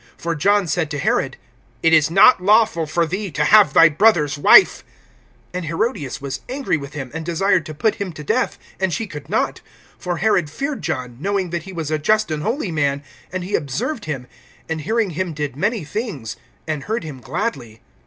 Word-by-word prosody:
(18)For 170 Hz, 0 st, -3 dB
John 200 Hz, +6 st, +2 dB
said 165 Hz, -2 st, -1 dB
to 150 Hz, -, -4 dB
Herod: 135 Hz, -1 st, 0 dB, 0.5 s
It 165 Hz, -, +4 dB
is 155 Hz, -1 st, +5 dB
not 195 Hz, +5 st, +6 dB
lawful 210 Hz, -4 st, +3 dB
for 170 Hz, +2 st, +1 dB
thee 190 Hz, +5 st, -4 dB
to 150 Hz, -, +1 dB
have 205 Hz, -2 st, +6 dB
thy 165 Hz, -, +8 dB
brother's 155 Hz, -3 st, +3 dB
wife. 145 Hz, -, +6 dB, 0.7 s
(19)And 180 Hz, -2 st, -4 dB
Herodias 165 Hz, -, -2 dB
was 140 Hz, -1 st, -5 dB
angry 270 Hz, -4 st, -1 dB
with 140 Hz, -2 st, -6 dB
him, 135 Hz, -4 st, -6 dB
and 165 Hz, 0 st, -5 dB
desired 175 Hz, +1 st, +1 dB
to 155 Hz, -, -7 dB
put 215 Hz, +8 st, +1 dB
him 195 Hz, -2 st, -3 dB
to 150 Hz, -, -9 dB
death; -, -, 0 dB, 0.2 s
and 190 Hz, -1 st, 0 dB
she 225 Hz, -, -2 dB
could 150 Hz, -8 st, -10 dB
not, -, -, -1 dB, 0.4 s
(20)for 175 Hz, -1 st, -2 dB
Herod 180 Hz, -4 st, +1 dB
feared 280 Hz, -, -4 dB
John, 125 Hz, -2 st, -4 dB
knowing 195 Hz, -1 st, -1 dB
that 170 Hz, -1 st, -3 dB
he 195 Hz, -, -8 dB
was 165 Hz, -4 st, -4 dB
a 155 Hz, -, 0 dB
just 215 Hz, +4 st, +1 dB
and 155 Hz, -1 st, -2 dB
holy 225 Hz, -, -2 dB
man; 145 Hz, -2 st, 0 dB, 0.3 s
and 185 Hz, 0 st, -3 dB
he 190 Hz, +3 st, -7 dB
observed 170 Hz, -, -2 dB
him[6:20], 135 Hz, -5 st, -4 dB, 0.4 s
and 160 Hz, -1 st, -2 dB
hearing 220 Hz, +4 st, 0 dB
him 175 Hz, +1 st, -3 dB
did 145 Hz, -3 st, -4 dB
many 205 Hz, -, -1 dB
things, 150 Hz, -, -5 dB, 0.3 s
and 155 Hz, -3 st, -3 dB
heard 220 Hz, -1 st, -2 dB
him 150 Hz, -5 st, -8 dB
gladly. 125 Hz, -, -4 dB
165 Hz, 200 wpm, -20 LUFS, 150-205 Hz, 0.7 s, thy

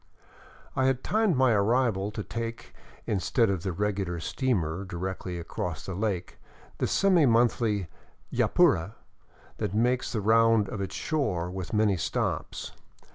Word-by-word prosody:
I 130 Hz, -, +2 dB
had 130 Hz, -1 st, +1 dB
timed 215 Hz, -5 st, +2 dB
my 130 Hz, -1 st, +4 dB
arrival 105 Hz, -1 st, +2 dB
to 105 Hz, 0 st, -5 dB
take, 115 Hz, +1 st, -6 dB, 0.3 s
instead 105 Hz, +3 st, +1 dB
of 95 Hz, -4 st, -2 dB
the 95 Hz, -, -2 dB
regular 95 Hz, -2 st, -2 dB
steamer 90 Hz, -, -1 dB
directly 90 Hz, 0 st, -5 dB
across 85 Hz, -1 st, -5 dB
the 95 Hz, -, -4 dB
lake, 95 Hz, -2 st, -3 dB, 0.4 s
the -, -, +1 dB
semi 185 Hz, -7 st, +4 dB
monthly 115 Hz, -4 st, +2 dB, 0.2 s
" -, -, -24 dB
Yapura 95 Hz, +7 st, +3 dB, 0.3 s
" -, -, -28 dB
that 100 Hz, -, -2 dB
makes 125 Hz, +3 st, +1 dB
the 110 Hz, -, -1 dB
round 115 Hz, -1 st, +4 dB
of 100 Hz, -, -4 dB
its 95 Hz, -, -4 dB
shore, 100 Hz, -, -1 dB
with 90 Hz, -3 st, -5 dB
many 105 Hz, -3 st, +2 dB
stops. 80 Hz, -, -2 dB
105 Hz, 145 wpm, -28 LUFS, 95-120 Hz, 0.4 s, my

